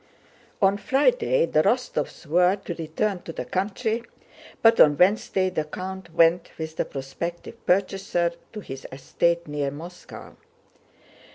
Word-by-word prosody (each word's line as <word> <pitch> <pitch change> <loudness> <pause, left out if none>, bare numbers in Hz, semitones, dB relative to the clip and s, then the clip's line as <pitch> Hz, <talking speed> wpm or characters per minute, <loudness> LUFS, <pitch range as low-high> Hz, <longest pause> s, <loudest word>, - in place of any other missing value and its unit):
On 195 +1 +4
Friday 485 - +2
the - - +2
Rostóvs - - -1
were 180 +4 +3
to 190 -3 -6
return 170 +4 -2
to - - -7
the - - -5
country, 215 +4 -1 0.6
but 225 0 +6
on 145 -1 +7
Wednesday 185 0 +2
the 155 -4 -1
count 185 +3 -7
went 170 +1 +4
with 160 0 -6
the - - 0
prospective 170 - -6
purchaser 185 -2 +1 0.2
to 210 - -6
his 135 -7 -8
estate 170 +6 0
near 145 -1 -2
Moscow. 170 +6 -10
180 Hz, 130 wpm, -25 LUFS, 160-195 Hz, 0.6 s, on